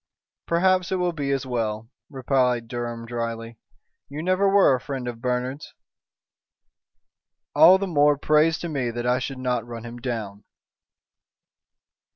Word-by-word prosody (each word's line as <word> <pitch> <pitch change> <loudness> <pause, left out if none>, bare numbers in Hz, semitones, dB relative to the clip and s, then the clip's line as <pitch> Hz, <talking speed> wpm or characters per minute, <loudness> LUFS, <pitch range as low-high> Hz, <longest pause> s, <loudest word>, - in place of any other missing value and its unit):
"Perhaps 185 +1 +2
it - - +1
will 180 -1 0
be 145 -3 -3
as 135 -1 -1
well," 115 -2 -3 0.2
replied 125 -3 0
Durham, 120 -1 -5
dryly. 115 -1 -5 0.5
"You 145 +3 -6
never 185 +2 +2
were 195 -7 +5
a 125 - -1
friend 135 -3 -5
of 115 -1 -6
Bernard's." 125 +3 -3 1.8
"All 165 +6 +8
the 195 - -2
more 145 -5 +3
praise 155 +3 +3
to 175 - -3
me 135 -7 -2
that 120 +1 -4
I 125 +1 +2
should 135 +1 -5
not 125 -2 -1
run 115 -1 -8
him 120 +1 -8
down." 110 -5 -5
130 Hz, 145 wpm, -24 LUFS, 120-155 Hz, 1.8 s, All